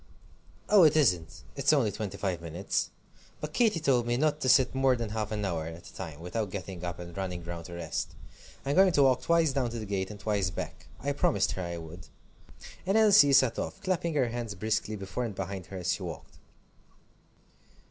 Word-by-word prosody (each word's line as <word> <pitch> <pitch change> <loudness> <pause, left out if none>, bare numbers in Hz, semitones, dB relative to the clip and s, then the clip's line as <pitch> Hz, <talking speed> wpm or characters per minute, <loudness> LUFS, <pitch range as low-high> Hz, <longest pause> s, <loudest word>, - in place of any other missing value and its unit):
"Oh, 205 -2 +6
it 155 -3 +6
isn't 85 - +1
it's 140 +1 +3
only 135 -9 +3
twenty 105 -3 -5
five 90 -4 -2
minutes. 85 +3 -2 0.5
But 150 0 -6
Katy 215 -6 +3
told 130 -6 +2
me 120 0 +1
not 150 +2 +1
to 130 - +1
sit 130 0 +5
more 135 -1 +3
than 115 -3 -3
half 110 -1 -3
an 105 -1 -2
hour 80 -4 -2
at 85 +1 -9
a - - -14
time 80 -1 -7
without 100 +4 -3
getting 95 -2 -6
up 90 -1 -4
and 85 -1 -9
running 90 -3 -4
round 85 -1 -6
to 85 - -8
rest. 85 -3 -4 0.5
I'm 140 - 0
going 190 -1 +6
to 145 - +5
walk 130 -2 +4
twice 165 -4 +3
down 130 -3 0
to 115 - -5
the 110 - -5
gate, 95 -2 -2
and 105 -1 -9
twice 100 -3 0
back. 90 - -7
I 145 - -1
promised 105 -8 +1
her 95 - -4
I 85 -1 -4
would." 85 +3 -10 0.8
And 195 +4 +2
Elsie 205 -9 +7
set 130 -3 +4
off, - - -4
clapping 170 -4 -1
her 130 -5 +2
hands 115 -3 -4
briskly 110 +2 -1
before 95 +4 -4
and 110 -5 -4
behind 95 -1 -5
her 95 - -7
as 90 0 0
she 95 - -5
walked. 85 -5 -8
105 Hz, 210 wpm, -29 LUFS, 90-135 Hz, 0.8 s, Elsie